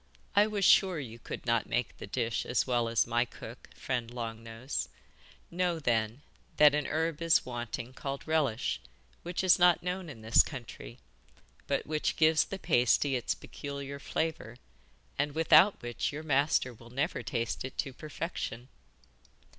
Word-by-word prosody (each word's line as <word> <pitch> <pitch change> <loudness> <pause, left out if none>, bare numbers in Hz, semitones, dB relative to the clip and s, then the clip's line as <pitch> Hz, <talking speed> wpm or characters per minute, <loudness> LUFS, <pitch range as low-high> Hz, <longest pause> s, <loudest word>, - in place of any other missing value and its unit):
'I 205 +1 +6
was 205 -3 0
sure 185 -4 +5
you 120 -4 -8
could - - -7
not 115 -2 +1
make 120 -2 -1
this - - -8
dish 115 -1 -1
as 125 - 0
well 120 -2 +1
as 115 -2 +2
my 120 +1 +2
cook, 120 - -11
friend 120 -3 -3
Long 115 -2 -5
Nose. 115 +4 -4 0.6
Know, 175 -1 0
then, 115 -2 -1 0.3
that 150 -1 +7
a 150 0 0
herb 160 0 -1
is 165 -1 +3
wanting 120 0 -5
called 135 +2 -6
Relish, 145 -8 0 0.4
which 175 +2 -3
is 185 -1 +5
not 175 -1 +5
known 180 -1 -3
in 115 -7 -10
this 110 +1 +6
country, 120 - -8 0.7
but - - 0
which 155 0 -1
gives 160 0 +4
the 195 - -6
pasty 130 - +2
its 125 - -1
peculiar 140 -1 -7
flavour, 155 -7 -3 0.6
and 145 0 0
without 165 +4 +6
which 120 0 -2
your 150 +2 -6
master 140 -3 +2
will 115 +1 -15
never 130 +4 -2
taste 115 -2 -3
it 130 - -7
to 135 -3 -2
perfection. 145 -5 -5
135 Hz, 160 wpm, -30 LUFS, 120-160 Hz, 0.7 s, that